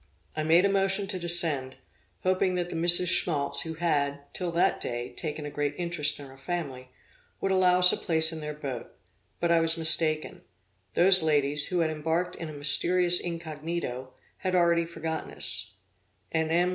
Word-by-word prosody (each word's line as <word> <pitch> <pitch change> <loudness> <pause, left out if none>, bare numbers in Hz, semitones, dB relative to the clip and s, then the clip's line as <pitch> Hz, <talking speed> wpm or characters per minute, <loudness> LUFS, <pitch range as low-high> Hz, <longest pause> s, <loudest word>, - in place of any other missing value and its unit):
I 155 - -3
made 165 +4 +2
a - - +1
motion 195 0 0
to 190 -2 -4
descend, 165 -7 +4 0.5
hoping 185 0 0
that 175 -1 -4
the - - -6
Misses 175 +2 +6
Schmaltz, 155 -5 +1
who 160 0 -6
had, 145 -4 -2
till 180 -2 -3
that 170 - 0
day, 120 0 -4
taken 150 -2 -7
a 145 - -7
great 145 0 -4
interest 170 -4 -2
in 145 - -10
our 135 0 -16
family, 135 -6 -6 0.5
would 195 - -2
allow 185 -1 +2
us 180 0 +7
a - - -2
place 160 -1 +1
in 160 - -7
their 150 0 -7
boat; 135 -5 -8 0.5
but 170 0 -1
I 170 - +3
was 165 0 +2
mistaken: 160 -1 +2 0.5
those 185 +1 +6
ladies, 150 -2 0
who 180 -2 -2
had 160 -1 -1
embarked 165 +3 -3
in 165 -1 -8
a - - -10
mysterious 175 +5 +3
incognito, 160 -6 -6 0.2
had 185 -1 -3
already 170 -1 +1
forgotten 160 -1 -6
us; 100 0 -2 0.6
and 160 0 -2
M. 175 +2 +1
165 Hz, 180 wpm, -26 LUFS, 150-175 Hz, 0.6 s, us